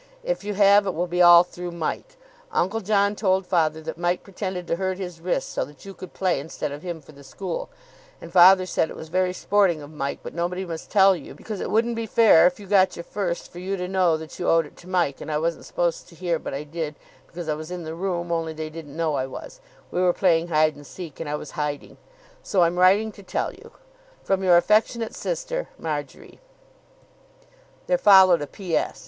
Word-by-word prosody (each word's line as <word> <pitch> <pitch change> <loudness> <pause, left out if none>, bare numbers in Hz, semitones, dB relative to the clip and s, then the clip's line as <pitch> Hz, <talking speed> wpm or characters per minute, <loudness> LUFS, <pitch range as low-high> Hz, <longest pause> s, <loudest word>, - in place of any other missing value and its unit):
If - - -2
you 210 0 -4
have, 200 0 +5
it 190 - -2
will 175 +2 0
be 175 0 0
all 175 0 +9
through 175 0 -8
Mike. 170 - -4 0.3
Uncle 220 - 0
John 200 0 +2
told 190 -2 +1
Father 160 -3 +1
that 160 - -7
Mike 175 +1 0
pretended 185 -2 -5
to 165 - -1
hurt 190 0 -2
his 180 -3 -7
wrist 180 +1 -1
so - - -1
that 145 +3 -16
you 195 - -8
could 185 -1 -10
play 185 -6 0
instead 150 0 -5
of 145 +1 -7
him 170 -2 -6
for 150 - -16
the 140 -1 -15
school, 175 +6 -5 0.5
and - - -11
Father 185 +1 +7
said 165 -2 0
it - - -8
was 160 - -9
very 185 +2 +1
sporting 185 -2 +2
of 145 0 -11
Mike 140 -2 -3
but - - -7
nobody 175 +2 -2
must 165 -2 -7
tell 195 -2 +5
you 155 - -10
because 215 -3 -7
it - - -3
wouldn't 230 +2 +1
be 225 0 -3
fair 205 -8 +6
if 180 - -3
you 205 - -10
got 190 -1 +3
your 170 - -7
first 175 -2 -4
for 175 - -9
you 195 +2 -3
to 180 0 -3
know 180 -4 +2
that 160 0 -10
you 175 - 0
owed 165 -1 +4
it 145 - -15
to 180 - -14
Mike 175 -7 0
and - - -5
I 150 - +1
wasn't 165 +2 -2
supposed 170 -1 -2
to 170 - -16
hear 170 -1 -1
but - - -6
I 140 - -4
did 155 0 -5 0.3
because 170 -1 -8
I 155 - +1
was 155 +2 -7
in 180 -1 -5
the 160 0 -6
room 175 -1 -3
only 165 -1 -1
they 155 0 -6
didn't 155 -2 -10
know 165 -2 0
I 130 -2 -1
was 130 - -10 0.3
(we 180 - -1
were 180 -1 +3
playing 170 -3 +2
hide 155 -2 +2
and 145 - -13
seek 170 -6 -9
and 165 - -5
I 150 - -1
was 150 - -7
hiding) 150 -3 -4 0.4
so 185 -4 +2
I'm 170 +1 +1
writing 200 +4 +4
to 200 - -14
tell 190 - -3
you, - - -15 0.5
"From 195 0 0
your 180 -2 +6
affectionate 220 +5 +2
sister - - -4
"Marjory." - - -6 1.5
There 270 - +1
followed 190 - +7
a 145 - -4
P.S. 180 -1 -2
175 Hz, 230 wpm, -24 LUFS, 160-190 Hz, 1.5 s, all